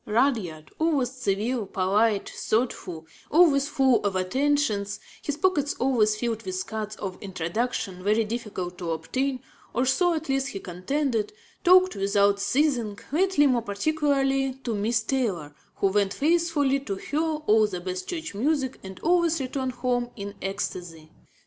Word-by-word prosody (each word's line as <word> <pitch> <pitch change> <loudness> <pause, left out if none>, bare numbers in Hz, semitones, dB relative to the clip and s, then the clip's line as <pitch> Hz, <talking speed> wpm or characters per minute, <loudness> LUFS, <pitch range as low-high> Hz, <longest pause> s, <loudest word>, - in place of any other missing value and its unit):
Rudyard, 210 - 0
always 295 -6 +1
civil, 235 -2 -1
polite, 200 +3 +1
thoughtful, 190 -8 -2 0.2
always 290 -4 +5
full 265 -4 +3
of 200 -2 0
attentions, 210 0 0 0.2
his 290 -1 -3
pockets 305 -6 +1
always 230 -5 +2
filled 225 0 -2
with 185 -2 -4
cards 215 -1 -4
of 190 -2 -6
introduction 190 +1 -3
very 215 +3 +3
difficult 210 -5 -5
to 175 -2 -4
obtain 255 - -2 0.3
or 250 - +2
so 345 +6 +3
at 315 0 -4
least 270 0 0
he 205 -8 -5
contended 220 - -1 0.3
talked 370 +1 +6
without 200 0 +2
ceasing, 235 -1 +1
lately 355 -1 +3
more 255 -4 +3
particularly 270 +3 +1
to 235 - -2
Miss 220 +2 +1
Taylor, 205 - -1 0.2
who - - -1
went 200 0 +1
faithfully 305 -3 +2
to 215 -8 -4
hear 290 +9 -3
all 300 -10 +2
the 185 -3 -5
best 185 +1 -5
church 325 - -4
music 265 +4 0
and 190 -1 -9
always 340 -1 +3
returned 260 -1 -2
home 245 -1 -1
in 200 -1 -6
ecstasy. 175 -5 -5
235 Hz, 145 wpm, -26 LUFS, 200-280 Hz, 0.3 s, talked